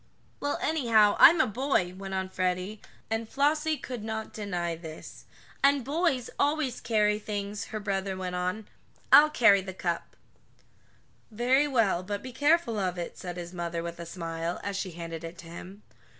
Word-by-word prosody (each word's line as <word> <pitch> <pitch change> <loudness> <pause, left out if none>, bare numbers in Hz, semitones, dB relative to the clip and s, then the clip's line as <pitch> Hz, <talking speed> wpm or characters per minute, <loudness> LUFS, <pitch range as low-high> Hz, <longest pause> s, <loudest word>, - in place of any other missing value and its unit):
"Well, 285 0 -1
anyhow, 230 -9 +4
I'm 335 +1 +9
a - - +5
boy," 220 -6 0
went 195 0 -6
on 190 0 -2
Freddie, 185 +3 -2 0.3
and 225 0 -2
Flossie 305 +2 +1
could 245 -6 -6
not 220 0 -4
deny 175 -5 -3
this. 160 -1 -10 0.4
"And 280 -3 +4
boys 285 -4 0
always 285 -4 0
carries 210 -2 +1
things," 205 -1 -4
her 215 - -5
brother 195 -2 -2
went 185 -1 -4
on. 180 +4 -2 0.4
"I'll 305 +1 +9
carry 225 -8 +5
the 190 -1 -8
cup." 170 -2 -3 1.1
"Very 250 +6 +2
well, 225 -10 +2
but 205 +2 -5
be 255 -1 -8
careful 290 -5 +2
of 185 -2 -1
it," 175 - -5
said 180 -1 -6
his 175 0 -7
mother 170 -1 -3
with 170 0 -6
a 170 - -7
smile, 165 0 -4
as 200 -1 -3
she 190 -2 -3
handed 165 -1 -7
it 165 +1 -7
to - - -11
him. 180 +4 -10
205 Hz, 170 wpm, -28 LUFS, 180-245 Hz, 1.1 s, I'm